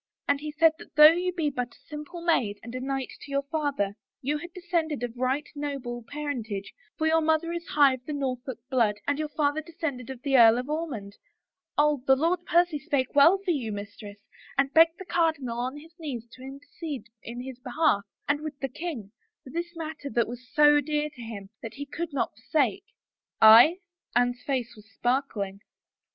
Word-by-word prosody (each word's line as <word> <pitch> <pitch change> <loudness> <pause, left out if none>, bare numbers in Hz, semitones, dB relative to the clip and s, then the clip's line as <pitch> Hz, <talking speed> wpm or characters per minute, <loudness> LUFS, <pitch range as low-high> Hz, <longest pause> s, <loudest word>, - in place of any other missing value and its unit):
And 285 0 +2
he 300 +1 -5
said 320 +2 +5
that - - -14
though 300 +1 +10
you 360 +2 0
be 325 -5 -1
but 245 -3 -4
a - - -27
simple 300 +3 -8
maid 215 -12 +1
and 235 +1 -8
a 255 - -3
knight 270 0 -3
to - - -11
your 280 0 0
father, 280 -9 -1 0.3
you 295 +3 -1
had 345 +3 -9
descended 335 -6 -2
of 240 -1 -4
right 260 +4 -1
noble 275 -5 -4
parentage, 245 -9 -4 0.2
for 315 - 0
your 320 +1 +4
mother 320 +1 +1
is 340 -1 -5
high 285 -2 +5
of 250 -1 -8
the 300 - -3
Norfolk 260 -2 -3
blood 230 -5 +3
and 285 +1 0
your 305 -1 -2
father 295 0 0
descended 300 -6 -5
of 265 -2 -6
the 275 -2 +1
Earl 230 -1 +8
of 250 +1 -3
Ormond 255 -11 -4 0.3
— - - -61
Oh, 295 -2 +3
the 265 - +7
Lord 335 +5 +1
Percy 345 -3 +3
spoke 275 -3 -1
well 310 +7 +7
for 365 - +2
you, 250 -9 -2
mis 205 0 -6
tress, 205 -1 -10 0.4
and 275 0 +2
bulged 325 +1 +6
the 380 - -9
cardinal 315 -9 0
on 255 +4 -3
his 320 +2 -14
knees 255 -8 -5
to 255 - -14
intercede 280 -1 -7 0.2
in 235 +1 -8
bis 260 -2 -8
behalf, 255 -4 +1 0.3
and 290 +1 +1
with 305 -2 -6
the 270 -2 -3
king, 255 - -6 0.3
for 260 - -11
this 345 +2 -4
matter 310 -3 -6
that 235 -1 +1
was 245 +2 -9
» - - -28
so 295 -1 +6
dear 300 +1 -1
to 255 - -12
him 210 -4 -8
that 225 -1 -7
he 285 - -5
could 330 +3 -5
not 275 - -1
forsake." 300 - 0 0.4
" - - -66
Aye? 235 +10 +9 0.2
" 350 - -35
Anne's 245 0 +2
face 255 -4 -2
was 215 0 -17
sparkling. 220 -5 -1
280 Hz, 210 wpm, -27 LUFS, 245-315 Hz, 0.4 s, though